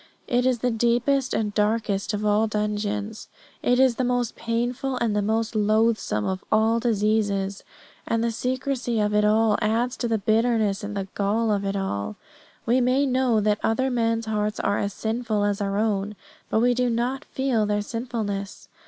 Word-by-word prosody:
It 245 +1 +1
is 255 -2 +2
the 245 - +2
deepest 240 +4 +1
and 210 -2 -1
darkest 210 -1 0
of 210 0 -2
all 210 +1 +3
dungeons. 210 0 -3 0.3
It 245 +1 +2
is 260 -3 +4
the 255 - 0
most 245 -1 0
painful 245 +3 -2
and 230 -4 0
the 210 - +2
most 220 +2 0
loathsome 215 - +1
of 190 0 -3
all 220 +1 +3
diseases. 205 -3 0 0.4
And 230 0 0
the 235 - +1
secrecy 250 -1 -2
of 210 0 +1
it 210 0 +3
all 215 0 +3
adds 235 +4 0
to 240 - -1
the 225 -1 +1
bitterness 220 -1 +1
and 205 0 -4
the 195 -1 -3
gall 215 +3 0
of 200 -1 0
it 195 0 -1
all. 105 - -3 0.5
We 245 +2 +3
may 255 +3 +2
know 255 -4 +2
that 210 0 +1
other 260 +4 +1
men's 230 -1 0
hearts 210 -1 -1
are 200 +1 0
as 200 - -1
sinful 220 -1 -1
as 205 0 0
our 200 0 -1
own, 210 -1 0 0.3
but 220 - +2
we 245 +1 +4
do 250 0 +1
not 245 +4 -1
feel 250 -6 0
their 205 0 0
sinfulness. 215 -4 -4
220 Hz, 180 wpm, -24 LUFS, 210-240 Hz, 0.5 s, is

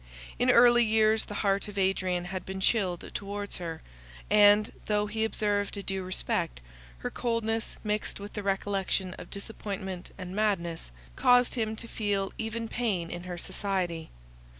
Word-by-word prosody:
In - - +3
early 240 0 +7
years 220 0 +3
the 205 - -7
heart 195 +1 +2
of 205 -1 -9
Adrian 185 -2 +1
had 185 0 -4
been 190 0 -5
chilled 190 -3 +1
towards 205 0 -3
her; 165 -2 -5 0.5
and, 210 0 +6 0.2
though 210 -1 +2
he 220 +1 -1
observed 205 -2 0
a 200 - -4
due 195 0 -2
respect, 180 - -2 0.4
her - - -4
coldness, 225 -2 -1
mixed 210 -1 -2
with 205 +1 -8
the 210 - -3
recollection 195 -1 0
of - - -9
disappointment 195 -3 -5
and 185 -1 -6
madness, 180 - 0 0.3
caused 245 -1 +5
him 220 -2 -1
to 230 - -9
feel 200 -4 -1
even 225 0 -2
pain 200 -9 -1
in 175 +1 -6
her 180 -1 -5
society. 180 -3 -2
200 Hz, 155 wpm, -29 LUFS, 185-220 Hz, 0.5 s, early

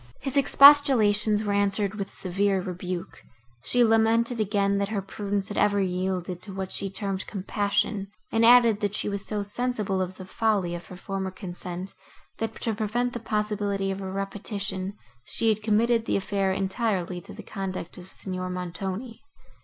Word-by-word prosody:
His 270 0 -4
expostulations 255 -7 +6
were 205 -1 -1
answered 200 0 +1
with 200 -2 -4
severe 195 +1 0
rebuke; 180 -1 -5 0.4
she 245 -1 +3
lamented 225 +1 +3
again, 200 -1 +1
that 200 0 -1
her 215 -2 -1
prudence 200 0 -3
had 205 - -2
ever 205 -1 +3
yielded 185 -1 -2
to 205 - -8
what 190 0 -4
she 195 - 0
termed 195 -1 -3
compassion, 205 0 -1 0.2
and 225 - +2
added, 235 -2 +7
that 205 -1 -1
she - - -2
was 200 -1 -2
so 210 -1 -2
sensible 210 -3 -2
of 185 0 -3
the 185 - -8
folly 200 -3 0
of 175 0 -7
her 185 - -9
former 190 0 -3
consent, 185 -1 -6 0.5
that, 225 - -3
to 225 - 0
prevent 235 +4 -1
the 240 - -4
possibility 210 -3 -1
of 195 +1 -4
a 190 -1 -5
repetition, 195 0 -4 0.3
she 225 - 0
had 215 -1 +1
committed 225 +2 +2
the - - +1
affair 195 0 0
entirely 190 -2 -1
to - - -11
the - - -9
conduct 190 -3 -5
of 180 +1 -11
Signor 185 -1 -2
Montoni. 185 +6 -5
200 Hz, 170 wpm, -26 LUFS, 190-220 Hz, 0.5 s, added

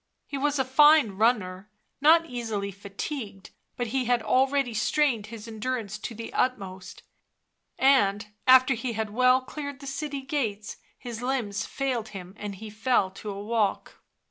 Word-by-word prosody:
He - - -7
was 290 +1 +1
a 265 - +1
fine 295 -2 +6
runner, 200 -2 0 0.3
not 325 +3 +6
easily 225 -7 -4
fatigued, 200 - -7 0.3
but 245 - -1
he 265 -2 +1
had 240 -1 +1
already 260 +2 +2
strained 230 0 +1
his 225 0 -9
endurance 220 -2 -4
to 230 - -6
the 230 +1 -7
utmost, 195 -7 -2 0.7
and, 210 -7 +3 0.2
after 260 +1 +7
he 240 0 -3
had 220 -1 -3
well 255 +3 +4
cleared 285 +1 -7
the 280 - -11
city 280 0 -4
gates, 225 -8 -3 0.2
his 240 -2 -7
limbs 245 -6 -2
failed 255 -5 -2
him 180 0 -10
and 205 -1 -5
he 215 +2 -9
fell 215 -3 +1
to 210 +2 -8
a 200 0 -5
walk. 215 -2 -1
235 Hz, 155 wpm, -27 LUFS, 210-265 Hz, 0.7 s, after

